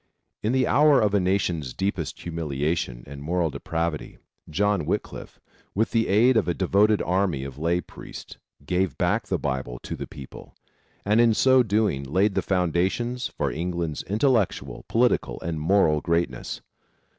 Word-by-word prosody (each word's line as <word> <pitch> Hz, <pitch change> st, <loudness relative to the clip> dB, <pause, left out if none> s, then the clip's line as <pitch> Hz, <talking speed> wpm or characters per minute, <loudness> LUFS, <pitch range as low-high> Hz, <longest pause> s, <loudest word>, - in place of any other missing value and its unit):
In 110 Hz, -, 0 dB
the 130 Hz, 0 st, +2 dB
hour 145 Hz, -2 st, +5 dB
of 105 Hz, -2 st, +2 dB
a 100 Hz, -, +4 dB
nation's 90 Hz, -8 st, -1 dB
deepest 95 Hz, -5 st, -3 dB
humiliation 75 Hz, -6 st, -2 dB
and 70 Hz, 0 st, -9 dB
moral 85 Hz, +1 st, 0 dB
depravity, 80 Hz, +1 st, -3 dB, 0.3 s
John 100 Hz, +1 st, +1 dB
Wycliffe, -, -, -4 dB, 0.4 s
with 110 Hz, +3 st, +1 dB
the 115 Hz, -1 st, +2 dB
aid 115 Hz, +5 st, +4 dB
of 110 Hz, -, +1 dB
a 85 Hz, -, 0 dB
devoted 100 Hz, +3 st, +3 dB
army 90 Hz, -7 st, 0 dB
of 70 Hz, 0 st, -8 dB
lay 85 Hz, +3 st, +1 dB
priests, -, -, -11 dB, 0.3 s
gave 90 Hz, +3 st, 0 dB
back -, -, 0 dB
the -, -, 0 dB
Bible 65 Hz, -2 st, -3 dB
to -, -, -5 dB
the -, -, -6 dB
people, 70 Hz, -2 st, -11 dB, 0.5 s
and 105 Hz, +3 st, +4 dB
in 115 Hz, -2 st, +4 dB
so 130 Hz, +2 st, +5 dB
doing 105 Hz, -, +1 dB
laid 95 Hz, +9 st, +1 dB
the -, -, +1 dB
foundations 95 Hz, -, 0 dB
for -, -, -2 dB
England's 85 Hz, -1 st, -3 dB
intellectual, 105 Hz, -, 0 dB
political 120 Hz, +2 st, +1 dB
and 80 Hz, -2 st, -3 dB
moral 80 Hz, -3 st, +3 dB
greatness. 85 Hz, +1 st, -2 dB
90 Hz, 155 wpm, -25 LUFS, 80-105 Hz, 0.5 s, hour